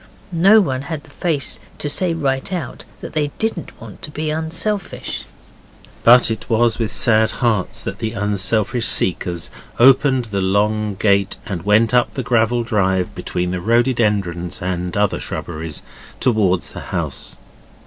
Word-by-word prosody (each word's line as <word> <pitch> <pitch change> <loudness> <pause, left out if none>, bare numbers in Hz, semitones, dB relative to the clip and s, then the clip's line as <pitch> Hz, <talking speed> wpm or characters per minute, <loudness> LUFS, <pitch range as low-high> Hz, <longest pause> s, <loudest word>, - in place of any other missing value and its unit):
No 195 +6 +6
one 130 -8 -1
had 145 +1 -5
the - - -18
face 150 -3 -1 0.2
to - - -3
say 170 +5 0
right 140 -1 -1
out 180 -3 -5 0.2
that - - -8
they 150 -2 +1
didn't 220 -6 -3
want - - -11
to - - -6
be 155 +1 -3
unselfish. 170 +5 -3 0.8
But 120 0 +6
it 110 +2 -5
was 115 0 +2
with 115 -2 0
sad 110 +1 +3
hearts 110 -7 -1
that - - -5
the 110 0 -3
unselfish 105 +3 0
seekers 85 -1 0 0.3
opened 130 0 +5
the 100 -1 0
long 105 +2 +1
gate 100 0 +2
and 95 -7 -4
went 110 +5 +3
up 125 -1 +2
the 130 - -2
gravel 120 0 +2
drive 95 -5 0
between 90 0 -3
the 90 -1 -3
rhododendrons 105 -6 +1
and 90 0 -3
other 105 -1 +1
shrubberies 80 -2 -5 0.4
towards 100 - +1
the - - -7
house. - - -4
115 Hz, 150 wpm, -19 LUFS, 100-135 Hz, 0.8 s, No